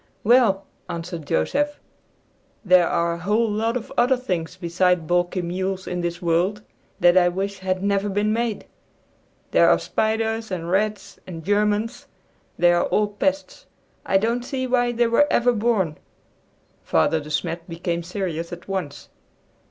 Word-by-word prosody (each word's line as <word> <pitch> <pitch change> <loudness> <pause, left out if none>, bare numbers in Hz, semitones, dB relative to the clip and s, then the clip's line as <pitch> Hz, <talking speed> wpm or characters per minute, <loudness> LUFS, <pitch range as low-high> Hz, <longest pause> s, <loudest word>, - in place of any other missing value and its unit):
"Well," 220 -4 +4 0.2
answered 170 -2 -6
Joseph, 290 - 0 0.9
"there 180 -2 +5
are 170 0 0
a 170 - -6
whole 210 +6 +1
lot 225 +3 0
of 230 - -8
other 250 +2 +3
things 180 -8 -3
beside 180 -1 +1
balky 175 +2 0
mules 185 +2 -3
in 180 0 -3
this 175 0 -4
world 180 +5 +1 0.4
that 175 0 +5
I 175 -1 +5
wish 195 +2 -3
had 185 0 -2
never 200 0 +1
been 205 +2 0
made. 230 -2 -2 0.9
There - - +5
are - - +5
spiders, 220 0 -1
and 175 -2 -4
rats, 200 0 -1
and 165 -3 -8
Germans. 210 +3 0 0.5
They 175 0 +5
are 175 - +2
all 210 -1 +1
pests. 285 - -2 0.4
I 195 - +2
don't 230 +4 0
see 260 0 -3
why 245 -1 +1
they 240 0 +2
were 235 +6 +3
ever 245 +1 +3
born." 205 -8 0 0.8
Father 80 - +2
De 150 0 -9
Smet 165 +3 -3
became 170 0 -3
serious 170 -2 -4
at 175 0 -9
once. 180 -8 -4
195 Hz, 150 wpm, -23 LUFS, 175-225 Hz, 0.9 s, there